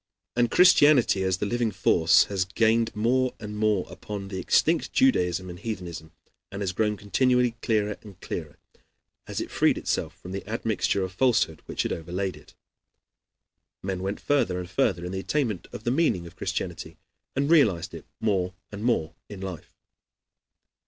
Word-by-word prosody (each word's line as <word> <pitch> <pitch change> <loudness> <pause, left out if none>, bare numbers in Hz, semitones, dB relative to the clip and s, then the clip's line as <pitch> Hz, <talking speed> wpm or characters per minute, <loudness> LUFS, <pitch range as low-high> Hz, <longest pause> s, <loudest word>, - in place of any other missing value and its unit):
And 120 -1 +2
Christianity, 145 - +5
as 95 -1 +1
the 105 - -2
living 120 +1 0
force, 85 -4 +4
has 95 -2 -1
gained 115 +4 +1
more 125 +4 +1
and 105 -1 -7
more 105 -3 +1
upon 100 +2 -7
the 95 -1 -4
extinct 160 - +2
Judaism 90 - +2
and 90 -1 -8
heathenism, 90 -7 -6 0.4
and 100 +1 -4
has 95 - -1
grown 105 +2 0
continually 125 +4 +2
clearer 105 -2 0
and 100 -4 -14
clearer, - - -6 0.7
as - - -4
it - - -5
freed - - +3
itself - - -2
from 90 - -9
the 95 +1 -4
admixture 110 -3 0
of 95 - -4
falsehood 125 +5 +1
which - - -2
had - - -1
overlaid 90 +3 -3
it. - - -17 1.3
Men 95 -1 -3
went 95 +2 -3
further 120 -11 +1
and 90 - -5
further 85 +1 +1
in 90 - -4
the 95 - -3
attainment 115 - -1
of - - -8
the 120 - 0
meaning 125 - +1
of 85 - -12
Christianity, - - -4 0.4
and 140 +1 +1
realized 110 - +3
it - - -9
more 95 -4 0 0.2
and 105 +1 -7
more 85 -10 +1 0.2
in 100 - -8
life. 95 -3 -8
100 Hz, 165 wpm, -26 LUFS, 90-115 Hz, 1.3 s, Christianity